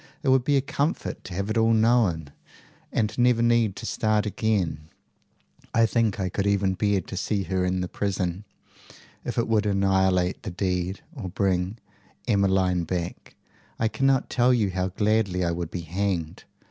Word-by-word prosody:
It 135 - +1
would 130 -1 +4
be 145 +2 +2
a - - +3
comfort 140 +4 -2
to 90 - -7
have 100 +3 -2
it 115 - +1
all 115 0 +4
known, 110 -10 +2 0.6
and 105 -1 0
never 120 -1 +4
need 115 -4 +3
to - - -7
start 110 -1 +1
again. 95 -8 -1 0.9
I 115 - +5
think 115 -3 +1
I 95 - 0
could 100 +2 -1
even 100 -1 +2
bear 100 0 +1
to 90 - -8
see 100 +1 -1
her 95 0 -1
in 90 0 0
the 90 - -2
prison. 95 -1 -2 0.8
If - - -4
it 115 - +1
would 110 -2 +2
annihilate 95 -2 +2
the 110 - -5
deed, 90 0 -2
or 115 - -6
bring 95 +1 0 0.5
Emmeline 95 -4 +2
back, 85 0 -5 0.4
I 110 - +1
cannot 135 +4 +1
tell 125 0 +3
you 105 -5 +1
how 90 0 -1
gladly 100 -2 +1
I 85 - +1
would 85 -1 -3
be 90 - -5
hanged. 85 -1 -3
100 Hz, 170 wpm, -25 LUFS, 90-110 Hz, 0.9 s, I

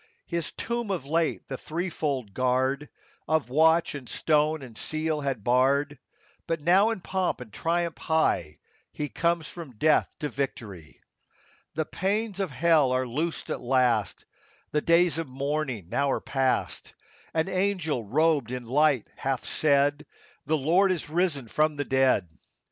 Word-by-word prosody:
His 170 -2 -2
tomb 235 -2 -3
of 180 -9 -2
late 160 +3 0
the 135 - -5
threefold 155 - -3
guard 130 +4 0 0.4
Of 155 -5 0
watch 160 +4 +4
and 135 -4 -8
stone 155 -1 +1
and 120 -4 -11
seal 155 +2 -2
had 135 -7 -2
barred; 135 +4 +2 0.5
But 165 -1 -1
now, 185 +8 +4
in 225 -5 -3
pomp 185 0 -1
and 115 -5 -10
triumph 170 0 -1
high, 125 - +1 0.3
He 150 -1 -4
comes 170 -1 0
from 155 -10 -10
death 155 +6 +3
to 150 - -3
victory. 110 - -5 0.8
The 160 0 0
pains 200 +4 -2
of 195 -3 -1
hell 155 -2 +3
are 130 0 +1
loosed 155 +7 -3
at - - -3
last; 125 -4 +1 0.5
The 150 - +1
days 170 -1 +3
of 165 - -3
mourning 135 - -3
now 140 +6 +1
are - - +1
past; 135 -2 -1 0.4
An 160 +1 +1
angel 185 - 0
robed 145 +2 +2
in 125 -1 -5
light 140 -1 +3
hath 135 -2 -2
said, 145 0 +2
— - - -26
" - - -37
The 155 - +2
Lord 175 +7 +3
is 165 -4 -3
risen 160 -7 0
from 155 +5 +1
the 145 0 -2
dead." 130 -9 +2
150 Hz, 155 wpm, -27 LUFS, 130-165 Hz, 0.8 s, watch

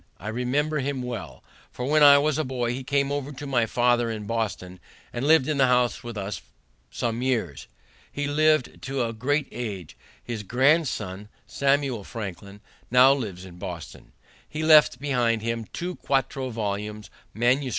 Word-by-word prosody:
I 105 - -6
remember 140 +7 0
him 135 -1 -2
well, 120 -5 -6 0.3
for 125 - -6
when 150 +3 +3
I 145 -1 +9
was 150 +1 +1
a - - +1
boy 125 -3 -2
he 130 +1 -5
came 140 +1 0
over 145 0 -3
to 140 +2 -8
my 125 -5 +1
father 120 0 +2
in 110 -2 -5
Boston, 100 -5 -3 0.3
and 125 +4 -2
lived 160 -4 +5
in 155 -2 0
the 130 - +5
house 125 -1 +2
with 120 -2 -7
us 100 0 -4 0.5
some 120 -1 -2
years. 115 - -2 0.4
He 145 - -3
lived 155 -1 +2
to 130 0 -2
a 115 - -4
great 140 +5 0
age. 100 -8 -6 0.3
His 115 -3 -5
grandson, 115 - +1 0.2
Samuel 140 -5 0
Franklin, 100 -2 -8 0.3
now 125 +2 +7
lives 100 -9 -5
in 90 -1 -13
Boston. 90 -4 -8 0.4
He 155 +1 -4
left 155 -5 +6
behind 120 -5 0
him 115 -1 -2
two 180 +1 -5
quarto 135 -1 -1
volumes, 105 -2 -4 0.2
MS. 125 +4 +2
125 Hz, 165 wpm, -25 LUFS, 110-140 Hz, 0.5 s, I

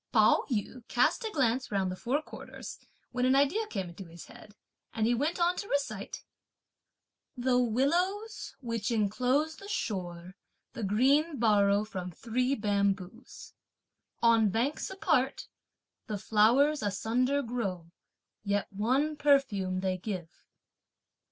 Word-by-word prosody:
Pao 215 -3 +4
yü 240 +1 -3
cast 250 - +2
a - - -1
glance 255 - 0
round 190 -2 0
the - - -4
four 265 +10 -1
quarters, - - -9 0.3
when 250 0 -1
an 260 +1 +4
idea 295 +11 +2
came 195 - -4
into 180 +3 -10
his 170 0 -12
head, 210 - -15 0.4
and 220 -1 +1
he 240 - +3
went 295 +9 -1
on 350 +1 +3
to 405 - -4
recite: 285 -4 -3 1.1
The 250 0 +2
willows, 350 - 0
which 230 -4 -2
enclose 250 +8 +1
the 395 - -11
shore, 180 - -4 0.4
the - - -6
green 275 - +2
borrow 205 -3 +3
from 185 -4 -6
three 250 +8 -1
bamboos; 200 0 -2 0.7
On 225 -2 +5
banks 240 +9 -1
apart, 295 -8 0 0.6
the 210 - -3
flowers 240 +9 +3
asunder 245 +7 0
grow, 195 -9 -4 0.5
yet 200 -1 -1
one 260 +9 +1
perfume 230 -11 +2
they 185 -1 -1
give. 180 -4 -7
230 Hz, 130 wpm, -30 LUFS, 200-275 Hz, 1.1 s, On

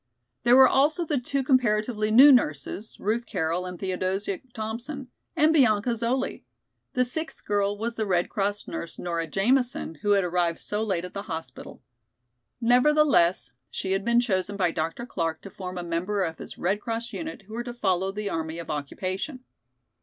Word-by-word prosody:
There 240 +1 +5
were 265 0 +9
also 300 +5 +2
the 295 -4 0
two 270 +2 -1
comparatively 215 -4 +2
new 260 +7 +9
nurses, 195 - +1
Ruth 230 +3 -1
Carroll 170 +3 -1
and 180 -1 -6
Theodosia 190 +1 -2
Thompson, 235 +5 -5 0.3
and 310 +2 +4
Bianca 240 -6 +4
Zoli. 235 +3 -1 0.5
The 250 0 +2
sixth 315 +6 -5
girl 205 0 0
was 230 +2 -3
the 220 -1 -1
Red 180 -2 +2
Cross 205 0 -2
nurse, 170 - -5
Nora 170 -2 -2
Jamison, 235 - 0
who 205 0 +3
had 200 -1 +3
arrived 175 -1 0
so 210 +1 -3
late 190 -5 -1
at 180 - -9
the 200 - -4
hospital. 160 -6 -7 0.8
Nevertheless 250 - +4 0.2
she 190 - -4
had 195 +1 +1
been 235 +2 +3
chosen 200 -4 -1
by 180 -3 +2
Dr. 165 +9 -3
Clark 165 -8 -2
to 195 - -9
form 185 -1 -7
a 175 - -3
member 180 +4 -1
of 165 -2 -4
his - - -9
Red 195 +4 0
Cross 230 +2 -4
unit 315 -9 -6
who 215 +3 -13
were 240 +1 -3
to 240 - -6
follow 190 -5 0
the 210 +1 -4
army 160 -3 -3
of 170 -2 -5
occupation. 185 - -4
205 Hz, 175 wpm, -26 LUFS, 180-245 Hz, 0.8 s, were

